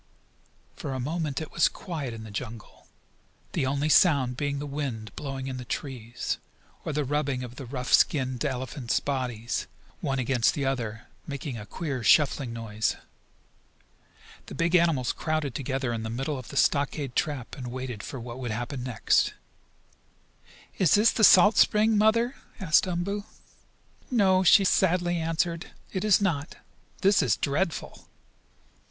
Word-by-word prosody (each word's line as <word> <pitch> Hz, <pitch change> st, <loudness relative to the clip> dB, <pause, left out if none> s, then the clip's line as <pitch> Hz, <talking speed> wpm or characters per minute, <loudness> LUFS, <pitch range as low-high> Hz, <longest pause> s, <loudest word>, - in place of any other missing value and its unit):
For 135 Hz, -, -5 dB
a 130 Hz, -, -3 dB
moment 150 Hz, +1 st, -2 dB
it 155 Hz, -, -7 dB
was 170 Hz, -, +4 dB
quiet 155 Hz, -9 st, -5 dB
in 115 Hz, -1 st, -8 dB
the 110 Hz, -, -9 dB
jungle, 115 Hz, 0 st, -8 dB, 0.6 s
the 130 Hz, -, 0 dB
only 140 Hz, +2 st, 0 dB
sound 140 Hz, -6 st, +4 dB
being 145 Hz, +1 st, -2 dB
the 145 Hz, -, -4 dB
wind 135 Hz, -7 st, -5 dB
blowing 135 Hz, -2 st, -5 dB
in 130 Hz, -1 st, -4 dB
the 125 Hz, -, -6 dB
trees, 120 Hz, -3 st, -4 dB, 0.4 s
or -, -, -3 dB
the 150 Hz, 0 st, -1 dB
rubbing 140 Hz, -2 st, -1 dB
of 125 Hz, 0 st, -9 dB
the 135 Hz, -, -7 dB
rough 125 Hz, 0 st, -3 dB
skinned 130 Hz, -4 st, +3 dB
elephants' 130 Hz, -2 st, -2 dB
bodies, 125 Hz, -5 st, -3 dB, 0.3 s
one 135 Hz, -1 st, -1 dB
against 125 Hz, -2 st, +2 dB
the 140 Hz, -, -1 dB
other, 115 Hz, -4 st, -2 dB, 0.2 s
making 140 Hz, -2 st, -5 dB
a 105 Hz, -2 st, -8 dB
queer, 140 Hz, -8 st, -4 dB
shuffling 135 Hz, +3 st, +3 dB
noise. 110 Hz, -2 st, -2 dB, 1.5 s
The -, -, -8 dB
big 170 Hz, +1 st, 0 dB
animals 165 Hz, -8 st, +3 dB
crowded 155 Hz, -4 st, -2 dB
together 135 Hz, -2 st, -2 dB
in 115 Hz, -, -3 dB
the 110 Hz, -, -4 dB
middle 135 Hz, +4 st, -3 dB
of 130 Hz, -, -10 dB
the 140 Hz, -, -7 dB
stockade 140 Hz, -3 st, +1 dB
trap, 145 Hz, -5 st, -2 dB
and 125 Hz, -2 st, -7 dB
waited 125 Hz, -3 st, -5 dB
for 135 Hz, -, -7 dB
what 120 Hz, +1 st, -8 dB
would 125 Hz, -2 st, -4 dB
happen 120 Hz, +4 st, -4 dB
next. 125 Hz, -3 st, +1 dB, 1.4 s
"Is 180 Hz, -5 st, +5 dB
this 210 Hz, +3 st, +5 dB
the 220 Hz, -, -1 dB
salt 205 Hz, +2 st, +7 dB
spring, 215 Hz, +1 st, +4 dB
Mother?" 230 Hz, +4 st, +3 dB, 0.2 s
asked 170 Hz, -1 st, +3 dB
Umboo. 195 Hz, +4 st, -2 dB, 0.8 s
"No," 195 Hz, -6 st, +4 dB
she 195 Hz, +2 st, +6 dB
sadly 175 Hz, -2 st, +2 dB
answered. 165 Hz, +1 st, -1 dB, 0.3 s
"It 190 Hz, -, -2 dB
is 210 Hz, -3 st, +5 dB
not. 165 Hz, -7 st, -1 dB, 0.5 s
This 200 Hz, +2 st, +4 dB
is 115 Hz, -5 st, +2 dB
dreadful!" 155 Hz, +4 st, -2 dB
140 Hz, 155 wpm, -27 LUFS, 125-165 Hz, 1.5 s, salt